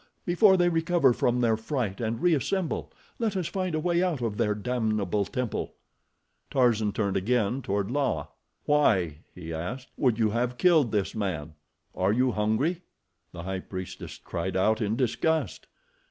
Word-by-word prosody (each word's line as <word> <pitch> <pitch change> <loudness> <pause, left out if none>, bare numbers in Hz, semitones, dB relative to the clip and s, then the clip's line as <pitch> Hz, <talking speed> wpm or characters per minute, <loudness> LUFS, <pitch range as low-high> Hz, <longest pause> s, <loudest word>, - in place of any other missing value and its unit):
Before 190 +2 +5
they 175 -1 +3
recover 165 -5 +3
from 125 +1 +1
their 115 -2 +3
fright 110 -2 -3
and 115 0 -2
reassemble, 175 +2 0 0.3
let 220 -4 0
us 180 - -1
find 185 -1 -2
a - - 0
way 175 +2 +1
out 180 -6 0
of 115 -4 -2
their 105 -3 +1
damnable 105 -3 0
temple." 125 +1 -3 0.7
Tarzan 115 -5 +2
turned 100 -2 -1
again 120 +4 +1
toward 100 -1 -2
La. 130 - 0 0.4
"Why," 95 - +2 0.2
he 80 -2 -7
asked, 115 +12 -5
"would 125 -5 +2
you 110 -2 +2
have 120 +2 -1
killed 160 - +4
this 105 -3 0
man? 85 -8 -3 0.4
Are 95 +2 +1
you 125 +2 +2
hungry?" 110 +12 0 0.5
The 85 -2 -8
High 95 +1 -3
Priestess 95 0 -7
cried 95 +3 -3
out 110 +4 +2
in 105 +1 0
disgust. 135 - 0
115 Hz, 155 wpm, -27 LUFS, 100-150 Hz, 0.7 s, Before